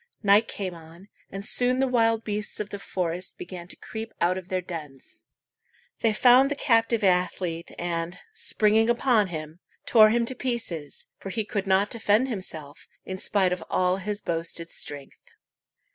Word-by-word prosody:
Night 205 Hz, +2 st, +5 dB
came 190 Hz, -3 st, -4 dB
on, 170 Hz, +4 st, -14 dB, 0.2 s
and 195 Hz, +1 st, -6 dB
soon 250 Hz, +2 st, +3 dB
the 270 Hz, -, +3 dB
wild 230 Hz, -2 st, +2 dB
beasts 210 Hz, 0 st, -4 dB
of 210 Hz, -1 st, -3 dB
the 200 Hz, -, -5 dB
forest 180 Hz, -2 st, -3 dB
began 175 Hz, -1 st, -8 dB
to -, -, -6 dB
creep 220 Hz, 0 st, -8 dB
out 175 Hz, +2 st, +2 dB
of 185 Hz, -1 st, -7 dB
their 185 Hz, -, 0 dB
dens. 155 Hz, -7 st, -9 dB, 0.7 s
They 225 Hz, -, +2 dB
found 250 Hz, +5 st, +6 dB
the 290 Hz, -, -1 dB
captive 230 Hz, -4 st, +2 dB
athlete, 180 Hz, -2 st, 0 dB
and, 170 Hz, 0 st, -3 dB, 0.2 s
springing 220 Hz, +2 st, +2 dB
upon 235 Hz, -3 st, +3 dB
him, 160 Hz, -1 st, -7 dB, 0.3 s
tore 215 Hz, -2 st, +7 dB
him 235 Hz, +1 st, +2 dB
to 260 Hz, -, -3 dB
pieces, 230 Hz, -, -3 dB
for 195 Hz, -, -7 dB
he 215 Hz, +2 st, -2 dB
could 200 Hz, -1 st, -3 dB
not 195 Hz, +2 st, +3 dB
defend 230 Hz, +3 st, +2 dB
himself, 160 Hz, -, -6 dB, 0.2 s
in 185 Hz, 0 st, -5 dB
spite 190 Hz, -3 st, +2 dB
of 180 Hz, -, -5 dB
all 185 Hz, 0 st, +2 dB
his 205 Hz, +2 st, -4 dB
boasted 165 Hz, 0 st, -4 dB
strength. 145 Hz, -1 st, -8 dB
195 Hz, 165 wpm, -26 LUFS, 175-225 Hz, 0.7 s, tore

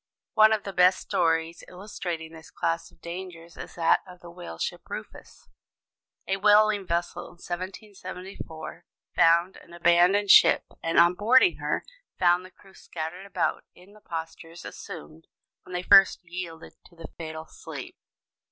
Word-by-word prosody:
One 220 Hz, 0 st, +6 dB
of 215 Hz, -2 st, +1 dB
the 195 Hz, -, -6 dB
best 180 Hz, +1 st, +5 dB
stories 165 Hz, 0 st, 0 dB
illustrating 180 Hz, -4 st, -6 dB
this 160 Hz, -1 st, -13 dB
class 165 Hz, 0 st, -2 dB
of -, -, -26 dB
dangers 170 Hz, -1 st, -8 dB
is -, -, -10 dB
that 165 Hz, -1 st, +3 dB
of 180 Hz, -1 st, -13 dB
the 170 Hz, -1 st, -12 dB
whaleship 170 Hz, -, -6 dB
Rufus. -, -, -10 dB, 0.8 s
A 195 Hz, -, -1 dB
whaling 210 Hz, -1 st, +4 dB
vessel 175 Hz, +1 st, -2 dB
in -, -, -13 dB
1774 185 Hz, -3 st, -8 dB, 0.3 s
found 170 Hz, +3 st, +4 dB
an 170 Hz, -, -16 dB
abandoned 175 Hz, +4 st, +4 dB
ship; -, -, +7 dB, 0.2 s
and 165 Hz, 0 st, -1 dB
on 170 Hz, +1 st, +6 dB
boarding 255 Hz, -, +4 dB
her, -, -, -2 dB, 0.3 s
found 175 Hz, 0 st, +3 dB
the 185 Hz, -, -12 dB
crew 190 Hz, 0 st, -21 dB
scattered 175 Hz, +4 st, -7 dB
about 195 Hz, -, -1 dB
in 185 Hz, +3 st, -18 dB
the 215 Hz, -, -18 dB
postures 165 Hz, 0 st, -8 dB
assumed 75 Hz, +2 st, -10 dB, 0.4 s
when 185 Hz, -, -11 dB
they 180 Hz, 0 st, -3 dB
first 195 Hz, +1 st, +6 dB
yielded 170 Hz, -2 st, -8 dB
to 175 Hz, -, -19 dB
the 165 Hz, -2 st, -10 dB
fatal 160 Hz, -1 st, -6 dB
sleep. -, -, -9 dB
175 Hz, 150 wpm, -26 LUFS, 165-190 Hz, 0.8 s, ship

